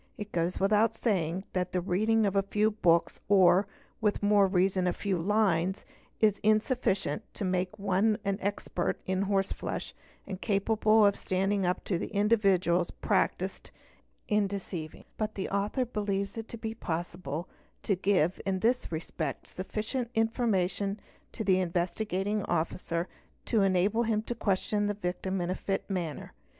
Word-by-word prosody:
It 210 0 -6
goes 170 +1 -1
without 210 +3 +3
saying 185 -6 0
that 180 -1 -1
the 180 - +2
reading 215 +5 +2
of 200 -1 0
a 195 - +5
few 210 +2 +1
books 170 -5 +2
or, 190 0 +5 0.3
with 210 -1 +1
more 205 -1 +5
reason, 185 0 +2
a 180 - +2
few 200 -2 -1
lines 190 -1 +1 0.3
is 210 -2 +3
insufficient 215 -1 +1
to 205 - -3
make 185 0 -1
one 200 +2 +2
an 200 0 0
expert 200 -3 -2
in 185 0 0
horseflesh 195 -1 -2 0.3
and 190 -1 -6
capable 215 +1 +3
of 200 -1 +4
standing 195 0 0
up 180 - -1
to 175 -4 -2
individuals 195 -5 +2
practised - - -1 0.6
in 210 - +2
the - - +4
art - - +2
of - - -3
deceiving; 180 -5 -6
but 215 -1 -2
the 190 - -3
author 205 +6 0
believes 200 -4 -2
it 225 -1 -5
to 235 - -8
be 220 0 -4
possible 170 -4 -4 0.4
to 200 - +1
give 185 -2 +1
in 195 -1 0
this 245 -1 +1
respect 160 -3 -4
sufficient 220 +6 -4
information 210 -3 0 0.3
to 220 - -4
the 190 -2 +3
Investigating 185 +3 -1
Officer 170 +1 -1 0.4
to 225 -4 +2
enable 195 +3 +2
him 220 -2 +1
to 240 - -3
question 205 -1 0
the 205 - -1
victim 190 0 -2
ina 175 +1 -1
fit 195 +1 -3
manner. 175 -6 -4
195 Hz, 155 wpm, -29 LUFS, 180-210 Hz, 0.6 s, a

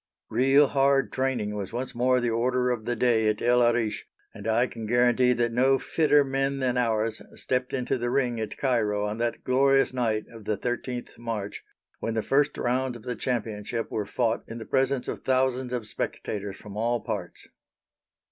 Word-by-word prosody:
Real 135 +3 +5
hard 135 -1 +2
training 130 -6 -1
was 100 -2 -4
once 125 +3 -3
more 125 +1 +2
the 120 -1 0
order 125 +2 +1
of 115 -3 -3
the 120 - -1
day 115 -2 +2
at 105 0 +1
El 125 +1 +3
Arish, 120 -2 +1 0.3
and 105 - -8
I 115 +2 +3
can 115 -3 -7
guarantee 120 +1 +4
that 120 -1 0
no 130 +3 +3
fitter 150 0 +3
men 135 0 -1
than 130 -2 0
ours 115 -2 0
stepped 125 0 -1
into 125 -1 -1
the 120 +1 -1
ring 120 -3 0
at 110 -2 -4
Cairo 110 -6 +1
on 105 +2 -3
that 120 0 -2
glorious 135 +1 +3
night 110 -4 0
of 115 -3 -12
the 105 -1 -1
13th 125 0 -4
March, 110 -4 -4 0.4
when 115 - -3
the 110 - 0
first 145 +1 +2
rounds 125 0 0
of 110 - -16
the 125 0 -3
championship 115 -2 -3
were 105 -2 -2
fought 115 +1 0
in 115 - -7
the 115 - -7
presence 135 +2 0
of - - -3
thousands 130 -1 0
of 120 -3 -2
spectators 100 -1 -4
from 105 -1 -11
all 115 +2 0
parts. - - -5
120 Hz, 185 wpm, -26 LUFS, 110-130 Hz, 0.4 s, Real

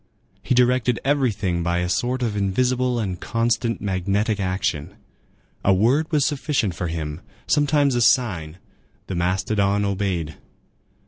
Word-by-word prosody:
He 125 - 0
directed 125 -1 +2
everything 110 -11 +1
by 85 +1 0
a 90 0 0
sort 125 +7 -1
of 110 -3 -1
invisible 125 +5 +1
and 95 -5 -3
constant 115 0 -1
magnetic 100 +2 0
action. 95 -6 -2 0.7
A 95 - +4
word 135 - +2
was 150 -3 +2
sufficient 140 - 0
for 85 +1 -3
him, 80 -1 -4 0.2
sometimes 145 -1 +2
a 120 - +1
sign; 90 -11 +2 0.5
the - - -5
mastodon 100 +3 0
obeyed. 95 -6 -2
105 Hz, 130 wpm, -22 LUFS, 90-125 Hz, 0.7 s, A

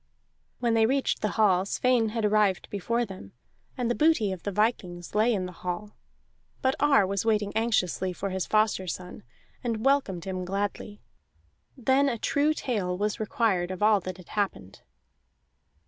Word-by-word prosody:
When 235 -2 +1
they 225 -1 +4
reached 270 +2 0
the 210 - +1
hall 190 -4 +4
Sweyn 235 +2 +1
had 220 0 -1
arrived 210 -3 +2
before 230 +4 -1
them, 185 - -11 0.4
and 250 -2 -1
the 240 - +1
booty 300 -9 +3
of 185 -2 -5
the 205 - -3
vikings 185 -5 -1
lay 215 +3 +3
in 195 -5 0
the 180 - -6
hall; 180 +4 -6 0.7
but 260 0 +3
Ar 275 -7 +4
was 195 +1 -1
waiting 210 -2 +1
anxiously 200 -5 0
for 195 +2 -4
his 190 -1 -2
foster 215 -3 +1
son, 180 +1 -6 0.4
and 230 -2 -2
welcomed 265 -11 +1
him 185 -1 -3
gladly. 200 +2 -4 0.7
Then 265 +3 +3
a 235 - -2
true 290 +6 +1
tale 195 -11 -2
was 210 +2 -1
required 210 -4 0
of 185 +2 -4
all 210 -1 +5
that 185 -1 -6
had 185 - -15
happened. 105 - -3
210 Hz, 165 wpm, -27 LUFS, 185-230 Hz, 0.7 s, all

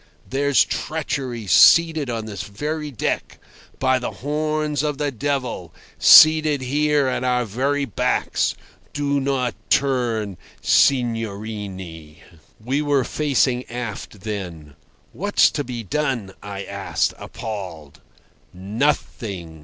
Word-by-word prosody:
there's 140 +1 +2
treachery 135 -7 -3
seated 160 - +5
on 115 -2 -3
this 100 -4 -6
very 150 +10 -4
deck. 125 - -3 0.4
By 130 -1 +2
the 125 - -3
horns 150 0 -2
of 150 -2 -2
the 145 -1 -1
devil! 125 - -3 0.3
seated 155 -2 +7
here 145 +2 +1
at 130 -1 -1
our 125 -1 +1
very 140 +7 -1
backs. 110 - 0 0.4
Do 145 -1 0
not 135 -3 -1 0.2
turn, 120 -8 0 0.2
signorine." 105 - -1 0.4
We 130 +7 -1
were 145 -3 +2
facing 130 -4 +1
aft 115 -4 -6
then. 90 -8 -6 0.4
"What's - - +3
to - - -2
be 120 -2 -6
done?" 120 -4 -2
I 100 -1 -6
asked, - - -2
appalled. 95 - -7 0.5
"Nothing. 95 - -3
125 Hz, 110 wpm, -22 LUFS, 105-145 Hz, 0.5 s, seated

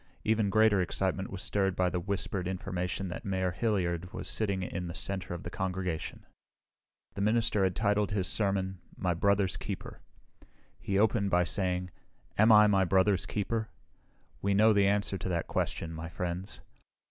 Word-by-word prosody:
Even 110 -2 +2
greater 110 -1 +4
excitement 95 +1 -1
was 95 -1 -2
stirred 95 -2 +1
by 90 - +2
the 90 0 -1
whispered 95 0 -3
information 95 0 -3
that 85 - -6
Mayor 95 -2 -1
Hilliard 90 -4 -1
was - - -6
sitting 100 -4 -1
in 90 -1 -4
the 85 - -6
center 95 -2 -3
of 85 - -8
the - - -6
congregation. 90 -3 -3 0.9
The - - -4
minister 110 -1 +2
had 95 -1 +1
titled 105 -2 +1
his 100 -3 0
sermon, 95 -3 0 0.2
"My 90 -2 0
Brother's 100 +2 +1
Keeper." - - -6 0.8
He 100 - -1
opened 105 -1 +2
by 90 -1 +3
saying, 90 0 -1 0.4
"Am 110 +2 +5
I 105 -1 +8
my 100 -2 +4
brother's 95 +1 +2
keeper? 110 +2 -2 0.7
We 100 0 +1
know 110 +2 +6
the 100 -1 +4
answer 100 -1 +1
to 95 - -4
that 85 -2 -1
question, 80 0 -2
my 80 +1 -6
friends. 90 +2 -5
95 Hz, 165 wpm, -30 LUFS, 90-100 Hz, 0.9 s, I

